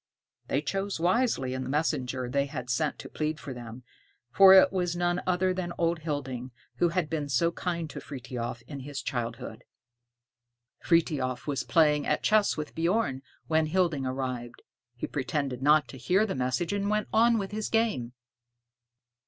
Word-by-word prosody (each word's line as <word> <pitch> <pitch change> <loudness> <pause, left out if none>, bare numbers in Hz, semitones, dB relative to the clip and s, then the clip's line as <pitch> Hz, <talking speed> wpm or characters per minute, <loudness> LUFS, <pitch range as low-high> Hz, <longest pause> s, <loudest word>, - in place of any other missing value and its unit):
They 140 - 0
chose 195 +4 -2
wisely 180 - +1
in 130 - -3
the 130 - -5
messenger 130 -4 -1
they 140 +2 0 0.2
sent 125 +5 -1
to - - -9
plead 155 0 -3
for 135 - -7
them, 120 0 -9 0.5
for 195 +7 +8
it 190 - +7
was 175 -2 0
none 175 0 0
other 185 0 +2
than 180 -2 -4
old 170 0 +1
Hilding, 135 -5 -4 0.3
who 175 - +3
had 175 -2 0
been 150 -2 -3
so 170 +6 +2
kind 170 -1 -3
to - - -6
Frithiof 120 -3 -6
in 140 +3 -8
his 140 +1 -6
childhood. 120 -2 -4 1.2
Frithiof 140 -7 +1
was 145 -2 -1
playing 150 -3 +3
at - - 0
chess 215 -4 +3
with 155 -1 -5
Bjorn 165 -5 0 0.2
when 160 -1 +2
Hilding 160 -5 +1
arrived. 130 -2 -4 0.3
He 120 - -4
pretended 135 -2 -2
not 150 +2 +4
to 130 - -9
hear 185 - +2
the 200 - -2
message, 130 +8 -1
and 200 0 -1
went 210 0 0
on 230 +1 +5
with 195 -2 -3
his 215 0 -3
game. 180 - 0
150 Hz, 165 wpm, -28 LUFS, 130-180 Hz, 1.2 s, for